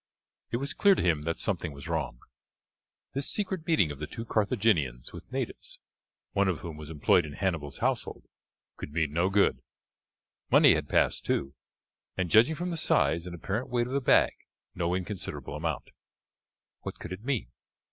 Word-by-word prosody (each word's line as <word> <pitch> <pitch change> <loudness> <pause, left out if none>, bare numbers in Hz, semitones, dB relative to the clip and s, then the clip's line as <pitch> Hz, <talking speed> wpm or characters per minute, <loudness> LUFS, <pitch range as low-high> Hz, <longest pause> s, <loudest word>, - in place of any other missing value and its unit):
It 120 - -1
was 140 +3 -3
clear 200 -1 +5
to - - -1
him 85 -4 +2
that 85 0 -1
something 75 - -1
was 70 0 -9
wrong. - - -2 0.9
This 140 +1 -1
secret 190 -5 -1
meeting 155 - +3
of 70 - -8
the 75 - -4
two 115 - -7
Carthaginians 100 - +1
with - - -11
natives, - - -5 0.5
one 100 0 +2
of 90 -4 -1
whom 85 -2 -6
was 75 0 -9
employed 85 +4 +3
in 75 -2 -7
Hannibal's 85 -7 -2
household, - - -1 0.5
could - - -7
mean 80 -3 0
no 85 +4 +2
good. 100 0 +3 0.9
Money - - +7
had - - -2
passed, - - +2
too, 70 - -1 0.6
and, 90 -3 -1
judging 120 +9 +6
from 175 +3 -3
the 165 - -2
size 85 - +2
and 85 - -6
apparent 105 +8 -3
weight 120 -1 +1
of 125 - -6
the 140 - +1
bag, - - +5 0.4
no 85 0 0
inconsiderable 95 -5 -4
amount. 80 -2 -3 0.9
What - - -7
could 90 - -7
it 95 +4 -9
mean? 130 -3 -2
95 Hz, 175 wpm, -29 LUFS, 80-120 Hz, 0.9 s, Money